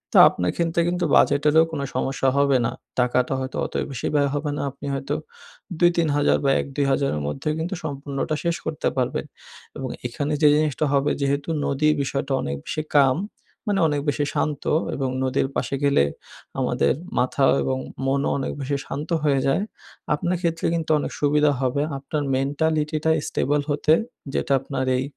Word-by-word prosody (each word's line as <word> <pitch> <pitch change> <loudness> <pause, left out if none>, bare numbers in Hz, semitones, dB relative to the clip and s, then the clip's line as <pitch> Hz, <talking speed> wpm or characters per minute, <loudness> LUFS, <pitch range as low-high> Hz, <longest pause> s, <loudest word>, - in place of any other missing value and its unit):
তা - - +9
আপনার 90 0 -1
ক্ষেত্রে 170 0 0
কিন্তু 175 0 0
বাজেটেরও 150 +3 +5
কোনো 145 -3 -3
সমস্যা 135 0 +1
হবে 140 -1 +4
না। 115 - 0 0.3
টাকাটা 125 +1 +2
হয়তো 130 0 -4
অত - - -7 0.2
বেশি 125 -4 -3
ব্যয় 145 -1 +3
হবে 145 0 -2
না। - - -2
আপনি - - -11
হয়তো 135 0 -2 0.6
২,০০০-৩,০০০ 165 -5 +3
বা 135 - +4
১,০০০-২,০০০ 140 0 0
এর - - -3
মধ্যেও 135 - -2
কিন্তু 175 +4 -2
সম্পূর্ণটা 140 0 -3
শেষ 170 -1 +1
করতে 160 -1 -2
পারবেন। 125 -2 -1 0.5
এবং 130 - -4 0.2
এখানে 145 +5 -3
যে 150 - +7
জিনিসটা 155 -1 +1
হবে, 140 +1 +2
যেহেতু 140 +2 0 0.2
নদীর 150 +2 +2
বিষয়টা 135 +1 -3
অনেক 70 - -3
বেশি 155 - -2 0.2
কাম, 135 -2 +5 0.5
মানে 205 -2 +1
অনেক 145 -1 0
বেশি 145 0 0
শান্ত 150 -2 -1 0.3
এবং 135 -2 -1
নদীর 130 +1 +1
পাশে 135 +2 -1
গেলে 140 - +4 0.6
আমাদের - - +2 0.3
মাথা 130 +2 +2 0.2
এবং 130 - 0 0.3
মনও 140 +1 +1
অনেক 135 - -2
বেশি 140 +2 -1
শান্ত 145 +3 -5
হয়ে 140 -2 +3
যায়। 135 +9 +2 0.5
আপনার 175 +4 0
ক্ষেত্রে 165 -2 -1
কিন্তু 165 -1 -1
অনেক - - -3
সুবিধা 150 0 +3
হবে। 130 +2 +1 0.2
আপনার 145 +2 -3
মেন্টালিটিটা 155 +3 0 0.2
স্টেবল 145 +2 +1
হতে, 150 +1 +3 0.4
যেটা - - 0
আপনার 135 -1 -3
এই 130 - 0
145 Hz, 165 wpm, -23 LUFS, 135-155 Hz, 0.6 s, তা